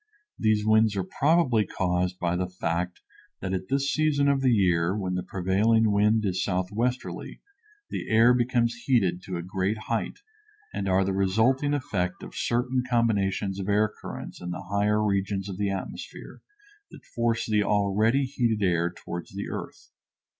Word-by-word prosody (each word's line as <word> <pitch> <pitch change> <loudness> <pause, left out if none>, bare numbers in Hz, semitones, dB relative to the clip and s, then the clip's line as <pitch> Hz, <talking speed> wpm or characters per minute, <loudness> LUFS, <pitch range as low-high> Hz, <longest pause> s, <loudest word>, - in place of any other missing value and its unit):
These 110 -1 +2
winds 110 -1 +4
are 95 - 0
probably 135 - +2
caused 90 -1 -1
by 90 -1 -1
the 90 0 -2
fact 90 0 -3 0.4
that 95 0 -3
at 95 0 -3
this 140 +1 +1
season 150 -2 +2
of 140 -1 +2
the 130 - +3
year, 90 -4 +2
when 95 -3 -2
the 90 - -1
prevailing 100 +5 +2
wind 105 +2 +3
is 95 -1 0
southwesterly, 105 +7 -2 0.5
the - - -4
air 115 +2 +6
becomes 120 -1 +1
heated 95 -9 +2
to 90 -2 -4
a 85 - -5
great 95 +4 -1
height, 115 -2 -2 0.6
and 100 - -2
are 95 +1 +3
the 95 - -1
resulting 110 +10 +2
effect 90 -10 -2
of - - -9
certain 125 +2 0
combinations 100 -5 +1
of 95 +1 -4
air 105 +1 +2
currents - - -8
in 90 - -5
the 90 - -5
higher 105 +1 +2
regions 100 -1 -1
of 95 -1 -6
the 100 -1 +1
atmosphere 95 -1 -7 0.5
that - - -14
force 115 -1 -1
the 105 -1 +2
already 105 +6 +2
heated 120 -5 0
air 85 -1 +1
toward 85 -1 -7
the 100 - -4
earth. - - -8
105 Hz, 165 wpm, -26 LUFS, 95-115 Hz, 0.6 s, air